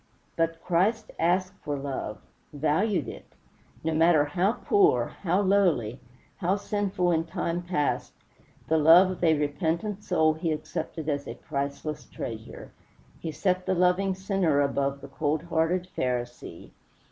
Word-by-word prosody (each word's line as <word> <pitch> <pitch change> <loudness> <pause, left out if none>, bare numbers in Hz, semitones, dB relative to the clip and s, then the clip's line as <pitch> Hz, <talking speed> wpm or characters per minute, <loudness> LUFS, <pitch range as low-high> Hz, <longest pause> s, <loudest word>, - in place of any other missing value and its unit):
But 165 0 -1
Christ 200 +6 +1
asked 185 +3 +1
for 145 -1 -2
love 135 -6 -4 0.3
valued 155 - 0
it. - - -10 0.5
No 160 0 0
matter 160 -1 +4
how 180 +8 +1
poor, 405 - +3 0.2
how 185 +1 +2
lowly, 175 - +2 0.4
how 185 0 +1
sinful 200 -3 -1
in 165 -1 +2
time 170 +1 -2
past, 175 -5 -1 0.6
the 160 0 +3
love 170 +5 +7
of 180 - -7
a 160 -2 +4
repentant 165 +7 -2
soul 160 -4 +3
he 160 +1 -2
accepted 155 +1 -4
as 145 -2 -2
a - - -6
priceless 140 +1 -4
treasure. 110 -1 -7 0.5
He 165 - -4
set 180 +4 -1
the 190 - +2
loving 180 +2 +2
sinner 190 -6 +1
above 140 0 0
the - - -9
cold 155 0 -1
hearted 170 +2 0
Pharisee. 120 -7 -4
165 Hz, 140 wpm, -27 LUFS, 145-185 Hz, 0.6 s, love